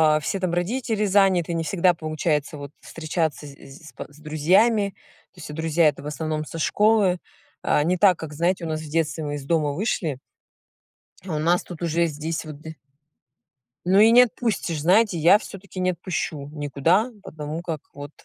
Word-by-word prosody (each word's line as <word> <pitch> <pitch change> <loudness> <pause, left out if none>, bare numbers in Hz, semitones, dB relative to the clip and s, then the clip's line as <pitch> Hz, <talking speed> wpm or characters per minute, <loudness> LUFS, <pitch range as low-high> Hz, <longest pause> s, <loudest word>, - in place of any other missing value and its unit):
а, 155 - +2
все 195 +5 -3
там 185 -2 -1
родители 215 +4 -1
заняты, 190 -4 +3
не 165 -1 -1
всегда 180 +1 +2
получается 155 -2 -2
вот 140 0 -8
встречаться 160 -2 -3
з 140 - -10
з 140 +3 -14
с - - -19
па - - -8
с 145 - -19
друзьями, 190 +8 +2 0.4
то - - -31
есть - - -9
все 150 - -8
друзья- 160 +1 +2
это 145 - -7
в 145 - -6
основном 155 0 -3
со 165 - -7
школы. 205 -1 +2 0.4
А 145 - +2
не 180 +3 +1
так, 185 -1 +5
как, 155 -2 -7
знаете, 175 +3 0
у - - -3
нас 155 -1 -2
в 155 - -9
детстве, 160 0 -1
мы 145 0 -3
из 145 - -6
дома 155 -2 +1
вышли 160 - -2 1.0
А 175 -4 -5
у - - -1
нас 170 +3 +2
тут 175 -2 -10
уже 170 +1 +1
здесь 155 +2 -4
вот 150 -2 -9
д 160 0 -9 1.1
Ну 190 +3 +4
и 220 +2 +7
не 245 +1 +8
отпустишь, 215 - -1
знаете, 195 +3 +3
я 170 +6 +6
всё-таки 195 -3 -10
не 185 - +2
отпущу 160 -5 -4
никуда, 160 - +1
потому 155 -1 -6
как 160 -4 -5
вот. 145 +1 -9
165 Hz, 195 wpm, -23 LUFS, 155-185 Hz, 1.1 s, не